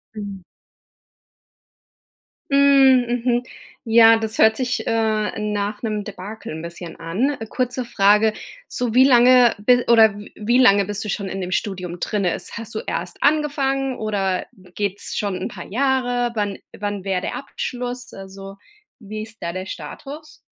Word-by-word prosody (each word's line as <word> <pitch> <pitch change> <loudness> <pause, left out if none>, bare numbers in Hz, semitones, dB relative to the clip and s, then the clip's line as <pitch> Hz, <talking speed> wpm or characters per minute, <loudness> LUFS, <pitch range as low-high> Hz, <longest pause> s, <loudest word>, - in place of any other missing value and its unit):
Mhm. 200 -3 -7 2.1
Hm, 275 -3 +5 0.2
mhm. 245 0 +2 0.4
Ja, 225 0 +7
das 220 0 -3
hört 220 0 +5
sich, 255 -1 -2
äh, 220 -2 0
nach 210 0 -2
'nem 215 -3 -2
Debakel 205 -2 -8
'n 160 - -6
bisschen 170 0 -8
an. 215 - -1
Kurze 250 -1 -2
Frage, 210 0 +3 0.3
so 245 -3 -3
wie 255 +1 +6
lange 250 -2 +6
bi 245 +3 +3
oder 220 -3 +6
w 205 - -11
wie 240 +4 +1
lange 200 -6 +5
bist 205 +1 -3
du 210 - -6
schon 200 -1 -3
in 195 0 -5
dem 180 0 -5
Studium 180 -3 -3
drinnen? 200 -5 -1
Ist - - -6
hast 230 -1 -8
du - - -2
erst - - -5
angefangen 275 -3 +1
oder 195 -4 -1 0.3
geht's 205 -1 -2
schon 200 -3 -1
'n - - -4
paar 175 -4 -9
Jahre? 245 0 0
Wann 205 -2 -2 0.2
wann 205 -2 -4
wäre 190 -2 -1
der - - -4
Abschluss? 250 -2 -5
Also, 195 0 -10 0.4
wie 215 0 -7
ist 225 +1 -11
da 170 - -3
der 185 +1 -5
Status? 280 - -9
215 Hz, 155 wpm, -21 LUFS, 195-245 Hz, 2.1 s, Ja